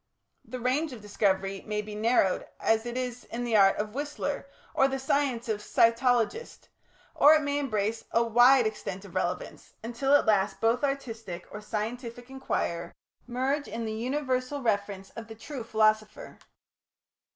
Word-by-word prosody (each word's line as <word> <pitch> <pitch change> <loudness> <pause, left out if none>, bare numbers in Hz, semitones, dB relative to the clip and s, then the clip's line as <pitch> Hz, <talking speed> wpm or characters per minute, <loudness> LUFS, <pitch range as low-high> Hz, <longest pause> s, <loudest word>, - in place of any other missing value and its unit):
The 255 +3 -7
range 260 +5 0
of 230 - -10
discovery 195 -1 0
may 210 0 -2
be 210 0 -8
narrowed 215 -3 +2
as 225 +1 +1
it 240 +1 -4
is 250 -1 -4
in 240 +1 -5
the 235 -2 0
art 195 -2 +6
of 210 0 -3
Whistler 290 0 -3 0.3
or 270 - +4
the 270 0 -2
science 265 -3 0
of 215 -2 -1
a - - -12
cytologist, 240 - +1 0.4
or 300 +2 +7
it 310 - +1
may 285 0 0
embrace 220 -4 -1
a 230 - +2
wide 245 +2 +6
extent 205 -2 -4
of 185 - -13
relevance, 180 -1 -3
until 245 +5 +2
at - - +4
last 205 -2 +2
both 230 +4 +1
artist 250 -7 -3 0.2
or 210 - -7
scientific 235 +3 -5
inquirer 170 -10 -3 0.3
merge 265 +4 -1
in 230 0 -4
the 220 - -3
universal 255 +3 -2
reference 200 -3 -1
of 225 -1 -9
the 225 - -9
true 260 +2 -7
philosopher. 215 -1 0
230 Hz, 165 wpm, -28 LUFS, 210-265 Hz, 0.4 s, or